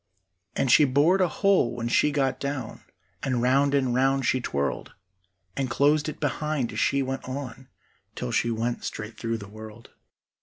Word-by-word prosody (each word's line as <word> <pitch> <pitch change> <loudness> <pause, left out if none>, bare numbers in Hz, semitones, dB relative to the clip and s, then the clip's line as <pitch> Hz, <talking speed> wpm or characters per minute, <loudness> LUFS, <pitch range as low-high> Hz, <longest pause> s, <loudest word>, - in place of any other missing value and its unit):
And 130 - +1
she 150 - +7
bored 145 +8 +3
a 185 - +4
hole 195 - +2
when 120 -1 -3
she 120 - +3
got 135 -2 0
down, 140 -5 -4 0.4
And 130 -3 -1
round 135 +3 +3
and 130 -3 +1
round 135 +1 +2
she 130 +1 +1
twirled, 70 - -3 0.6
And 135 -2 -2
closed 145 +4 +2
it - - -8
behind 150 -3 -2
as - - -3
she 140 0 +2
went 135 0 -4
on, 130 -1 -6 0.5
Till - - -4
she 120 - +1
went 115 +1 -2
straight 105 +1 -6
through 115 -1 -3
the 100 -2 -10
world. 110 +2 -12
130 Hz, 175 wpm, -26 LUFS, 120-140 Hz, 0.6 s, she